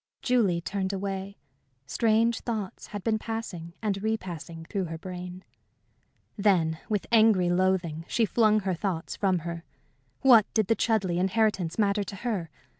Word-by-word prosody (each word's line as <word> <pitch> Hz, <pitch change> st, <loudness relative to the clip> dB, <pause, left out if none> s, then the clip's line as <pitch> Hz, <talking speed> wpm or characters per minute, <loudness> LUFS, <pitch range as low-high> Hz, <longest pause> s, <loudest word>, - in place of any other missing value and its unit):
Julie 210 Hz, -9 st, +2 dB
turned 195 Hz, +2 st, -2 dB
away. 195 Hz, 0 st, -4 dB, 0.5 s
Strange 230 Hz, -, +2 dB
thoughts 215 Hz, -5 st, -5 dB
had 205 Hz, -2 st, -7 dB
been 220 Hz, -1 st, +1 dB
passing 205 Hz, -8 st, -5 dB
and 200 Hz, -2 st, -1 dB
repassing 175 Hz, -6 st, -4 dB
through 195 Hz, +1 st, -2 dB
her 165 Hz, -1 st, -5 dB
brain. 180 Hz, +1 st, -7 dB, 0.9 s
Then, 175 Hz, -7 st, +2 dB
with 210 Hz, -3 st, 0 dB
angry 215 Hz, -6 st, +5 dB
loathing, 175 Hz, -3 st, 0 dB
she 230 Hz, -, +2 dB
flung 215 Hz, +1 st, +3 dB
her 190 Hz, -1 st, -1 dB
thoughts 175 Hz, -2 st, -3 dB
from 190 Hz, -4 st, +1 dB
her. 170 Hz, -1 st, -5 dB, 0.6 s
What 240 Hz, -6 st, +6 dB
did 220 Hz, -2 st, +3 dB
the 225 Hz, -, +4 dB
Chudleigh 195 Hz, -7 st, +1 dB
inheritance 190 Hz, -3 st, +1 dB
matter 205 Hz, -1 st, +2 dB
to 200 Hz, -, -7 dB
her? 200 Hz, -6 st, -3 dB
195 Hz, 145 wpm, -27 LUFS, 175-220 Hz, 0.9 s, What